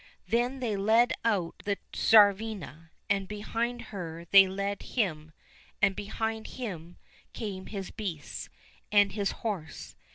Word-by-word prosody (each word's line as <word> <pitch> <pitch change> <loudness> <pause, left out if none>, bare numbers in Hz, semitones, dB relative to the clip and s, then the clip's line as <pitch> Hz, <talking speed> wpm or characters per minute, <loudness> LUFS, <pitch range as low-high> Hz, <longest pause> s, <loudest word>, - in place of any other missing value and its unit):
Then 245 +3 0
they 225 -4 0
led 220 +5 +4
out 200 -7 0
the 200 -1 -1 0.2
Tsarivna, 205 -6 +3 0.2
and 200 -1 0
behind 230 +4 -3
her 170 -3 -6
they 195 -1 +9
led 200 +1 -3
him, 160 -9 -2 0.5
and 195 -1 +3
behind 220 +2 -3
him 175 -8 -7 0.4
came 195 -4 -5
his 195 -3 -5
beasts 185 -9 -5 0.4
and 205 -1 +5
his 200 -1 -1 0.2
horse. 190 -8 -4
200 Hz, 125 wpm, -29 LUFS, 190-220 Hz, 0.5 s, they